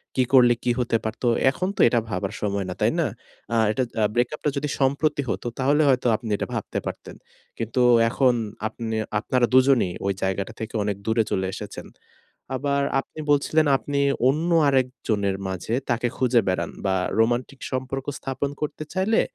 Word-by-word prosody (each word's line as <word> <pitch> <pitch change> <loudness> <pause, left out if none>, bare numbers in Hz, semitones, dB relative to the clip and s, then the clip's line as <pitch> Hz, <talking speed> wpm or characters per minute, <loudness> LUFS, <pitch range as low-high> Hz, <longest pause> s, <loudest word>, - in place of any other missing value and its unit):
কী 130 - +3
করলে 125 -2 +7
কী 125 - +2
হতে 115 -2 +1
পারত। 110 +3 -5 0.3
এখন 185 +7 -2
তো - - -14
এটা 120 0 +3
ভাবার 100 0 -3
সময় 100 -2 -1
না, 90 - -3
তাই - - +3
না? - - +2 0.5
আ - - +2
এটা 130 +4 0 0.3
ব্রেকআপটা 125 +5 0
যদি 145 +1 -2
সম্প্রতি 140 +2 +1
হত - - -2
তাহলে 145 +3 +3
হয়তো 125 -2 +2
আপনি 110 0 -6
এটা - - -3
ভাবতে - - -3
পারতেন। - - -7 0.4
কিন্তু 115 +3 -1 0.3
এখন 130 +1 +3 0.3
আপনি 110 0 -5 0.2
আপনারা 125 +2 +1
দুজনেই 130 -8 +4
ওই 100 - +1
জায়গাটা 95 +3 -2
থেকে 110 - -6
অনেক 100 -1 -1
দূরে 110 0 +2
চলে 95 - 0
এসেছেন। 105 -1 -7 0.7
আবার 140 +1 0 0.2
আপনি 145 - -8
বলছিলেন 155 +2 +3
আপনি 140 +1 -3 0.3
অন্য 155 +6 +1 0.2
আরেকজনের 120 -7 0
মাঝে 95 +4 -4 0.2
তাকে 120 0 +1
খুঁজে 125 -2 +3
বেড়ান 85 -3 -1
বা 95 - +2 0.2
রোমান্টিক 120 +4 +1
সম্পর্ক 130 +1 -3
স্থাপন 135 +1 -3
করতে 150 0 -3
চাইলে 195 +4 +2
125 Hz, 165 wpm, -24 LUFS, 110-140 Hz, 0.7 s, করলে